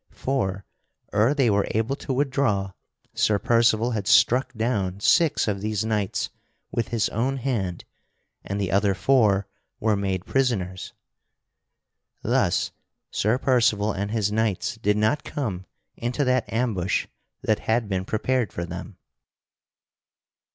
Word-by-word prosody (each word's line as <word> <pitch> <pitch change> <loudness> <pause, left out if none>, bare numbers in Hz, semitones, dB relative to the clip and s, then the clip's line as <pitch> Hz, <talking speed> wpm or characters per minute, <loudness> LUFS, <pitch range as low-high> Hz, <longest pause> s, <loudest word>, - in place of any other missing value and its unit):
For, 100 -8 -2 0.5
ere 110 +8 +3
they 130 -6 +3
were 100 0 +2
able 115 +5 0
to 140 - -5
withdraw, 130 -8 0 0.4
Sir 105 - +2
Percival 115 +1 +3
had 105 -4 -3
struck 125 +4 +4
down 105 -5 -1
six 160 - +3
of 100 -2 -1
these 110 0 -1
knights 105 -3 -1 0.4
with 115 - -1
his 115 -2 0
own 130 +5 -1
hand 110 -9 -2 0.6
and 100 +1 -3
the 95 -2 -1
other 100 0 +2
four 100 -1 +3 0.3
were 110 -1 +2
made 95 -2 -2
prisoners. 100 -9 -1 1.3
Thus - - +1 0.4
Sir 110 +4 +1
Percival 115 -6 +2
and 100 +1 -3
his 105 -2 0
knights 110 -1 -1
did 105 -2 +1
not 110 +8 +1
come 100 -10 -4 0.3
into 120 +5 -1
that 130 -1 +1
ambush 110 -6 0 0.4
that 110 - +1
had 115 0 +2
been 95 -2 -1
prepared 115 +3 0
for 85 - -4
them. 90 +3 -8
110 Hz, 130 wpm, -25 LUFS, 100-125 Hz, 1.3 s, struck